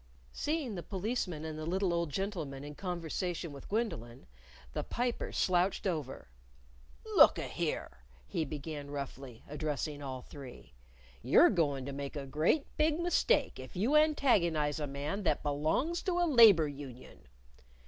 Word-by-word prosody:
Seeing 295 -6 -2
the 180 - -4
Policeman 185 -5 -3
and 155 -1 -5
the 155 - -4
little 185 0 +1
old 170 -2 0
gentleman 155 -6 -4
in 145 0 -7
conversation 175 0 -3
with 140 -1 -11
Gwendolyn, 130 - -3 0.5
the - - -2
Piper 245 0 -2
slouched 185 +2 +1
over. 155 -8 -3 0.9
"Look - - +8
a - - -3
here!" - - -3 0.3
he 160 - -2
began 145 0 -6
roughly, 135 -4 -7
addressing 150 0 -3
all 130 -2 -5
three; 135 - -11 0.5
"you're - - +6
goin' 145 -6 0
to 140 - -4
make 140 +1 -5
a 140 -2 -4
great 155 - +1
big 305 +1 +2
mistake 350 +8 +2
if - - -10
you 225 +11 +1
antagonize 190 - +3
a 150 - -2
man 145 +8 -3
that 160 -6 0
belongs 155 - 0
to 370 - -1
a 350 - +3
Labor 225 - +7
Union." 135 -3 -10
160 Hz, 150 wpm, -32 LUFS, 145-205 Hz, 0.9 s, Look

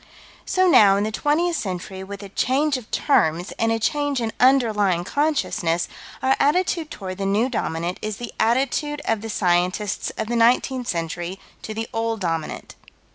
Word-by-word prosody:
So 370 -1 +3
now, 200 - +6
in 200 - +1
the 215 - -2
twentieth 320 +8 +1
century, 190 -3 -5
with 200 +1 -8
a 200 - -9
change 275 +8 +1
of 250 -4 -6
terms, 175 - +1
and 225 0 +2
a 225 - +1
change 290 +3 0
in 225 -2 -2
underlying 215 -9 +3
consciousness, 200 - 0 0.4
our 265 0 +4
attitude 330 +1 +1
toward 190 -6 -7
the 195 - -1
New 215 +6 +2
Dominant 170 -6 -2
is 215 -1 -4
the 240 -1 -7
attitude 275 +5 0
of 225 -2 0
the 225 - -6
scientists 185 +1 0
of 220 - -1
the 235 +2 -2
nineteenth 245 +2 +2
century 170 +2 -3 0.2
to 215 - -6
the 225 +1 -3
Old 225 0 -1
Dominant. 165 -4 -3
225 Hz, 170 wpm, -22 LUFS, 190-265 Hz, 0.4 s, now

